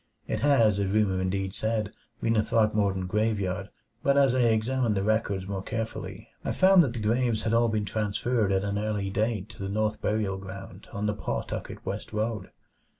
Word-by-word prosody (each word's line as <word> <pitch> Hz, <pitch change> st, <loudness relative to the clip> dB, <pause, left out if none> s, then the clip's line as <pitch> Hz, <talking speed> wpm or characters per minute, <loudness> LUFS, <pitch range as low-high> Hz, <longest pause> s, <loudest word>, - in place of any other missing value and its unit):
It -, -, -1 dB
had, 140 Hz, -3 st, +4 dB
as 105 Hz, -3 st, +3 dB
rumor 100 Hz, -1 st, +1 dB
indeed 95 Hz, 0 st, -1 dB
said, 110 Hz, -1 st, -1 dB, 0.3 s
been 115 Hz, -, +2 dB
the 110 Hz, -, +4 dB
Throckmorton 105 Hz, -4 st, +1 dB
graveyard; 100 Hz, -1 st, -1 dB, 0.3 s
but 140 Hz, +2 st, +3 dB
as 135 Hz, -3 st, +5 dB
I 130 Hz, -, +1 dB
examined 115 Hz, 0 st, +2 dB
the 95 Hz, -, 0 dB
records 100 Hz, -3 st, 0 dB
more 95 Hz, -1 st, -3 dB
carefully, 115 Hz, +3 st, -5 dB, 0.2 s
I -, -, -1 dB
found 190 Hz, -1 st, +6 dB
that 130 Hz, -6 st, -1 dB
the 120 Hz, -, -4 dB
graves 115 Hz, +1 st, +1 dB
had 110 Hz, -, 0 dB
all 115 Hz, 0 st, +4 dB
been 110 Hz, -1 st, 0 dB
transferred 110 Hz, +1 st, 0 dB
at 95 Hz, 0 st, +1 dB
an 100 Hz, 0 st, -1 dB
early 105 Hz, -2 st, -2 dB
date 110 Hz, -1 st, -1 dB
to -, -, -11 dB
the 95 Hz, -, -3 dB
North 110 Hz, +1 st, -1 dB
Burial 105 Hz, -3 st, 0 dB
Ground 95 Hz, 0 st, -9 dB
on 100 Hz, +1 st, -3 dB
the 105 Hz, -, +1 dB
Pawtucket -, -, -4 dB
West 100 Hz, +3 st, -5 dB
Road. 110 Hz, -2 st, -2 dB
105 Hz, 190 wpm, -27 LUFS, 100-115 Hz, 0.3 s, found